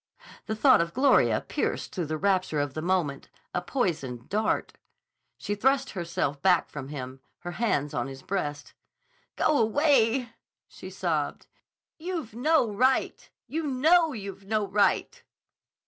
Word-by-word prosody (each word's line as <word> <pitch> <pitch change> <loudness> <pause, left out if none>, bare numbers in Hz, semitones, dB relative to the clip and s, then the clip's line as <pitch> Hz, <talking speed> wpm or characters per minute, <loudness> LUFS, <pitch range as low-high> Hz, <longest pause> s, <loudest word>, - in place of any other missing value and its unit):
The 220 - -2
thought 260 -2 +5
of 170 0 -3
Gloria 275 +2 +4
pierced - - -3
through 175 -4 -3
the 155 +1 -2
rapture 185 -3 +1
of 145 -2 -2
the 155 - -4
moment, 170 -5 -1 0.2
a 180 - 0
poisoned 155 - -2
dart. 215 +2 0 0.6
She 205 - -3
thrust 265 +6 +1
herself 170 -6 -3
back 180 -3 +3
from 135 -3 -6
him, 130 -2 -7 0.2
her 175 - -5
hands 170 -9 -1
on 120 +1 -2
his 135 -1 -10
breast. 150 -7 -4 0.6
"Go 305 -2 +2
away!" 240 -1 +2 0.4
she - - -10
sobbed. - - -2 0.5
"You've 325 - -5
no 285 +2 +2
right. 255 +6 0 0.2
You 320 - -3
know 315 +5 +4
you've 200 -5 -7
no 215 -1 0
right!" 200 +1 +1
200 Hz, 140 wpm, -27 LUFS, 155-255 Hz, 0.6 s, thought